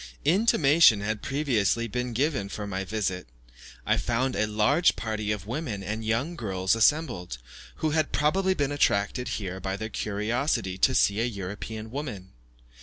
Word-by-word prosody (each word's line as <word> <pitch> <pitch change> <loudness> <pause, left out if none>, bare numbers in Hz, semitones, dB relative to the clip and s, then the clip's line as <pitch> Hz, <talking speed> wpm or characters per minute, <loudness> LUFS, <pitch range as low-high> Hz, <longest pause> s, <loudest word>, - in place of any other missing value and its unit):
Intimation 160 - +5
had 105 +1 -2
previously 120 - 0
been 125 +2 -3
given 130 -5 0
of 105 -1 -5
my 95 0 -2
visit. 95 - -3 0.6
I - - +2
found 125 +2 0
a 105 - +1
large 110 +11 +3
party 110 -1 -3
of 105 -3 -3
women 115 -4 -4
and 110 +3 -4
young 115 +10 -1
girls 95 - 0
assembled, 115 - +1 0.4
who 155 - -1
had 155 0 +1
probably 190 +6 +2
been 145 -3 0
attracted 125 -3 +1
here 95 -2 -4
by 95 +1 -3
their 110 +2 -5
curiosity 105 0 -1
to 130 - +3
see 100 +2 +3
a - - +1
European 110 +1 -6
woman. 120 -10 -6
110 Hz, 155 wpm, -27 LUFS, 100-140 Hz, 0.6 s, Intimation